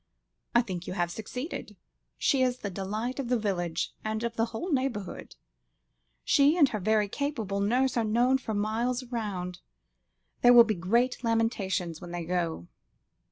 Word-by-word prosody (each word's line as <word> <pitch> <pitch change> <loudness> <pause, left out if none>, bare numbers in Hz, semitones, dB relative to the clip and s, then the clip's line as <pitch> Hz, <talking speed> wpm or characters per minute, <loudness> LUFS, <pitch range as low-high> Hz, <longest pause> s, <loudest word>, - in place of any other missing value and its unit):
"I 240 - +6
think 180 -5 -6
you - - -3
have 175 -2 -1
succeeded. 250 - -6 0.4
She 275 -3 +2
is 250 -1 +2
the 200 -5 -5
delight 215 +8 -3
of 255 -3 -3
the 250 - +3
village, 175 -6 -2
and 220 +1 -2
of 235 0 -2
the 225 - +2
whole 235 +11 -5
neighbourhood. 260 -8 -2 0.9
She 290 +3 +4
and 295 -5 +6
her 215 - -3
very 210 +1 +2
capable 225 -6 -2
nurse 250 +6 +2
are 235 - +2
known 240 +5 +3
for 220 -4 -4
miles 230 +5 0
round. 200 -8 -4 0.8
There 245 0 +7
will 240 -1 +10
be 220 -1 0
great 235 +9 +1
lamentations 205 -7 0
when 175 - -8
they 175 -1 -4
go." 170 - -2
220 Hz, 160 wpm, -28 LUFS, 190-250 Hz, 0.9 s, will